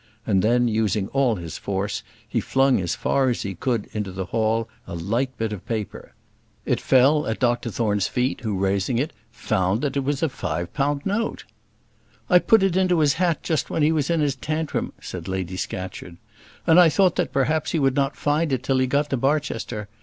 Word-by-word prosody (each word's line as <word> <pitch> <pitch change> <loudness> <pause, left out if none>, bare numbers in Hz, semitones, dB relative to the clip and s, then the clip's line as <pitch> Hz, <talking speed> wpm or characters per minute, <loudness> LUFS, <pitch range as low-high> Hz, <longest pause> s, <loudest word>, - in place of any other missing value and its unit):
and 95 -4 +2
then, 120 +3 +3
using 105 -3 0
all 135 -4 +2
his 85 -4 -7
force, 100 +1 -2 0.3
he - - -1
flung 135 -4 +2
as 85 - -1
far 135 -1 +1
as 120 - -1
he 100 - -4
could 115 +3 -2
into 105 -3 -3
the 95 0 -4
hall 110 +3 0 0.2
a - - -6
light 115 +10 -1
bit 110 -1 -2
of 95 -3 -7
paper. 110 -4 -5 0.5
It - - 0
fell 140 +4 +4
at 110 - -1
Dr 120 -1 +1
Thorne's 105 -3 0
feet, 125 +3 -1
who, 110 -5 -2
raising 100 +4 0
it, 145 +5 -1 0.2
found 95 +4 0
that 145 -2 -2
it - - +2
was 145 +2 -1
a - - +4
five 85 - -4
pound 145 0 0
note. 215 +3 -1 0.9
"I 180 - +8
put 220 +2 +4
it 190 -3 +2
into 185 -2 +3
his 150 -3 +4
hat 175 -2 0
just 155 -7 -1
while - - -1
he 150 +2 +4
was 155 -2 0
in 165 -2 +2
his 145 -2 +1
tantrum," 155 +3 -2
said - - -7
Lady 95 -1 -3
Scatcherd. 90 -2 -6 0.5
"And 165 +2 +6
I 175 -2 +7
thought 185 +2 +3
that - - 0
perhaps 155 +3 +1
he - - 0
would 135 -3 +2
not 135 -1 +1
find 150 +1 +1
it 130 -1 -1
till 135 -1 +1
he 130 - +2
got 145 +3 0
to 135 - +1
Barchester. 125 -6 -1
130 Hz, 205 wpm, -23 LUFS, 105-150 Hz, 0.9 s, I